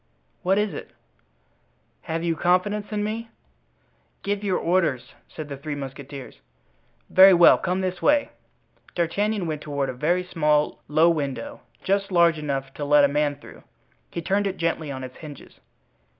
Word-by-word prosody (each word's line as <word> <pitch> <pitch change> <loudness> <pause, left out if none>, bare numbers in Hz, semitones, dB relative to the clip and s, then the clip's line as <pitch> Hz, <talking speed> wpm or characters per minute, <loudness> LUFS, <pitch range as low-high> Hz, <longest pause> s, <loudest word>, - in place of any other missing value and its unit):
"What 190 +2 +2
is 210 -1 0
it?" - - -9 1.1
"Have 165 +1 -4
you 170 -1 0
confidence 185 +6 0
in 210 -1 -1
me?" 225 +2 -4 0.9
"Give 200 +1 -2
your 190 -3 +1
orders," 170 -7 0 0.2
said 155 -2 -8
the 140 -1 -7
three 145 +2 -5
musketeers. 135 -2 -8 0.7
"Very 190 0 +8
well; 170 0 +7
come 180 +2 -1
this 185 -1 -3
way." 290 0 +3 0.6
D'Artagnan 200 +4 0
went 155 -2 -3
toward 140 -3 -2
a - - -3
very 170 +8 0
small, 150 -4 0
low 160 +3 +4
window, 160 - -4 0.2
just 195 0 0
large 170 -3 +4
enough 135 -2 -3
to 145 - -6
let 145 0 +5
a - - +4
man 145 0 0
through. 145 - -14 0.5
He 170 - -5
turned 200 +3 +1
it 195 - -4
gently 165 -2 -2
on 130 -1 -6
its 130 0 -9
hinges. 150 -3 -12
165 Hz, 160 wpm, -24 LUFS, 145-190 Hz, 1.1 s, Very